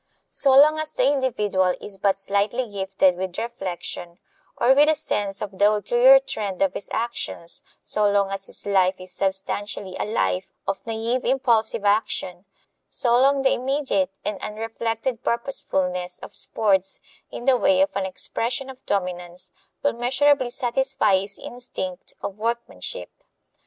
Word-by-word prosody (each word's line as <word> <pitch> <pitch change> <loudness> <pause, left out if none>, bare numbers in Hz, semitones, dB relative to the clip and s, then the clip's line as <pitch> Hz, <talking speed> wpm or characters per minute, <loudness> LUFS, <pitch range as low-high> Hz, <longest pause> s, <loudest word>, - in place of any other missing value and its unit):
So 270 -1 +4
long 305 +2 +6
as 310 0 -2
the 250 - +2
individual 210 -10 +1
is 195 -2 -8
but 195 -1 +2
slightly 205 +5 0
gifted 190 -2 +1
with 185 -1 -4
reflection 175 -5 -5 0.4
or 255 - +5
with 295 +3 +5
a 315 - +4
sense 200 -8 -1
of 200 -2 -7
the 205 +1 +6
ulterior 485 - +6
trend 210 - -4
of 190 -1 +1
his - - -5
actions 225 -7 -2 0.2
so 210 -1 +1
long 200 -1 +2
as 195 0 -4
his - - -6
life 190 -2 +3
is 185 0 -7
substantially 195 0 -2
a - - 0
life 95 - 0 0.2
of 195 -1 -2
naive 230 +3 -1
impulsive 235 -4 +1
action 200 -3 0 0.4
so 240 - +1
long 275 0 +3
the 265 - +4
immediate 260 -8 0 0.2
and 210 -2 -3
unreflected 225 +2 -3
purposefulness 180 -7 -1
of - - -10
sports, 195 -3 +1 0.3
in 240 - -7
the 265 -1 +5
way 280 +3 +3
of 290 0 +1
an 195 -1 0
expression 245 +7 -3
of 260 - -16
dominance, 180 -2 -3 0.3
will 285 - +2
measurably 260 +2 +2
satisfy 265 -2 +1
his 200 +1 -5
instinct 190 -7 -7
of 200 +1 -5
workmanship. 235 - -4
210 Hz, 150 wpm, -23 LUFS, 190-255 Hz, 0.4 s, long